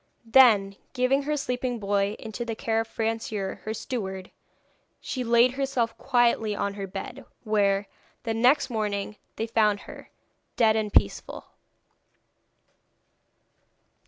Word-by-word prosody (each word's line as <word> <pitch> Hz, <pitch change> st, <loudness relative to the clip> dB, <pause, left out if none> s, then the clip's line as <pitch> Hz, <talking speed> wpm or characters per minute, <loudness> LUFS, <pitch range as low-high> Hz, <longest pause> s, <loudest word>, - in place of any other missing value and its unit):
Then, 220 Hz, -5 st, +5 dB, 0.2 s
giving 265 Hz, +1 st, +2 dB
her 300 Hz, +1 st, -2 dB
sleeping 250 Hz, -2 st, -2 dB
boy 200 Hz, -1 st, 0 dB
into 220 Hz, +2 st, -6 dB
the 230 Hz, -1 st, -4 dB
care 225 Hz, 0 st, -1 dB
of 225 Hz, -, -2 dB
Francoeur, 220 Hz, -3 st, -3 dB
her 215 Hz, -, -4 dB
steward, 190 Hz, -6 st, -5 dB, 0.7 s
she 255 Hz, -, -4 dB
laid 235 Hz, +1 st, +4 dB
herself 260 Hz, -4 st, -1 dB
quietly 240 Hz, -5 st, +2 dB
on 200 Hz, 0 st, -2 dB
her 200 Hz, -1 st, -5 dB
bed, 190 Hz, +1 st, -7 dB, 0.2 s
where, 200 Hz, -2 st, +1 dB, 0.4 s
the 225 Hz, -, -2 dB
next 250 Hz, +4 st, +3 dB
morning, 210 Hz, -2 st, -2 dB, 0.2 s
they 225 Hz, -, -2 dB
found 215 Hz, -3 st, +2 dB
her -, -, -12 dB, 0.5 s
dead 220 Hz, -2 st, +4 dB
and 215 Hz, -1 st, -1 dB
peaceful. 100 Hz, -, 0 dB
225 Hz, 125 wpm, -26 LUFS, 205-245 Hz, 0.7 s, Then